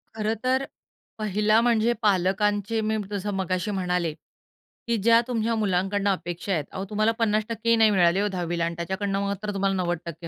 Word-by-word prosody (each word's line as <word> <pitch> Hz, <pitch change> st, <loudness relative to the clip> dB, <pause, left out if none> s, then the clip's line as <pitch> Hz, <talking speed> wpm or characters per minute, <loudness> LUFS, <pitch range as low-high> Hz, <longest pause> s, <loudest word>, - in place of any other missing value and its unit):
खरं 215 Hz, 0 st, 0 dB
तर 260 Hz, +1 st, +2 dB, 0.6 s
पहिला 215 Hz, +1 st, +2 dB
म्हणजे 235 Hz, -1 st, +2 dB
पालकांचे 205 Hz, +2 st, +1 dB
मी 220 Hz, 0 st, 0 dB
जसं 205 Hz, 0 st, -3 dB
मगाशी 190 Hz, +1 st, -1 dB
म्हणाले, 180 Hz, -4 st, -1 dB, 0.7 s
की 235 Hz, -1 st, +1 dB
ज्या 230 Hz, +3 st, +5 dB
तुमच्या 230 Hz, -2 st, 0 dB
मुलांकडनं 200 Hz, -1 st, 0 dB
अपेक्षा 175 Hz, 0 st, -4 dB
आहेत. 160 Hz, -4 st, 0 dB
अहो 190 Hz, 0 st, -5 dB
तुम्हाला 215 Hz, +1 st, +2 dB
50% 225 Hz, +1 st, 0 dB
ही 230 Hz, -, +6 dB
नाही 220 Hz, -1 st, +5 dB
मिळाले 180 Hz, -1 st, +3 dB
हो 205 Hz, -, +1 dB
10वीला 175 Hz, -3 st, -2 dB
आणि 170 Hz, 0 st, -3 dB
त्याच्याकडून 190 Hz, +4 st, -3 dB
मात्र 200 Hz, +1 st, -2 dB
तुम्हाला 195 Hz, 0 st, 0 dB
90% 175 Hz, -2 st, -3 dB
200 Hz, 165 wpm, -25 LUFS, 185-215 Hz, 0.7 s, ही